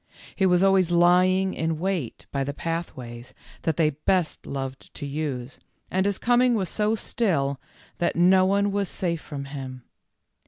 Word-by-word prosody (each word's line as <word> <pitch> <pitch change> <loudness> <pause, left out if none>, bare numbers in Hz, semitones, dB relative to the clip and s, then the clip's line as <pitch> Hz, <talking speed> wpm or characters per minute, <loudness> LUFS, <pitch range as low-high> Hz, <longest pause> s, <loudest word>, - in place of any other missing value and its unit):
He 190 - +3
was 180 0 +4
always 195 -3 +4
lying 180 +2 +4
in 160 0 -1
wait 175 -7 -3
by 140 -1 -1
the 140 +1 -4
pathways 130 -9 -5 0.3
that 160 -3 -1
they 155 -2 +3
best 155 +4 -1
loved 135 -1 -5
to - - -6
use, 140 -3 -4 0.3
and 190 +1 +1
his 200 - 0
coming 245 0 +3
was 190 -5 -1
so 215 +1 +1
still 140 - 0 0.4
that 175 - +1
no 185 +2 +5
one 200 +2 +2
was 200 -2 -1
safe 170 -4 -2
from 140 -2 -6
him. 130 -2 -7
170 Hz, 160 wpm, -25 LUFS, 140-190 Hz, 0.4 s, no